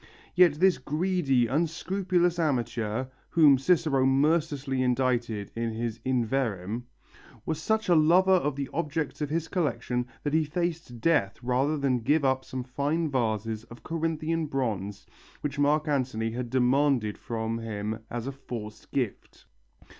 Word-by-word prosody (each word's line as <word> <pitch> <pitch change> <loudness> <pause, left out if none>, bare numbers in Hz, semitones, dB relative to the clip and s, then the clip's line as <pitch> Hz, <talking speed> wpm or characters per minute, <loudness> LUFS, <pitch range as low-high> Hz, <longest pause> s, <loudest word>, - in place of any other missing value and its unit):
Yet 180 -4 +6
this 185 +3 +3
greedy, 150 -3 +1
unscrupulous 175 - 0
amateur, 120 -5 -1 0.2
whom 145 -5 +6
Cicero 155 -3 +2
mercilessly 140 -1 +1
indicted 120 -5 0
in 115 -1 -2
his 115 0 -3
In 130 -2 +1
Verrem, 115 -3 -2 0.6
was 160 -1 -2
such 220 +5 0
a 180 - +5
lover 170 +4 +5
of 150 -6 +2
the 140 -1 -3
objects 155 -2 -2
of 150 - -1
his 165 +1 -1
collection 130 -8 -1 0.2
that 145 - -2
he 160 0 +4
faced 160 -6 -3
death 150 -12 +2
rather 130 +5 +1
than 135 -3 +1
give 145 +5 +2
up 130 0 +2
some 130 -1 -5
fine 145 +5 -1
vases 110 -3 -1
of 120 0 -13
Corinthian 165 0 -1
bronze 105 -7 -3 0.4
which 145 -1 -3
Mark 150 +2 +2
Antony 125 -6 0
had 120 +1 -4
demanded 130 -3 +2
from 115 0 -3
him 110 -1 -4
as 120 -1 -4
a 135 - -3
forced 115 -5 -8
gift. 125 -7 -4
135 Hz, 145 wpm, -28 LUFS, 120-155 Hz, 0.6 s, Yet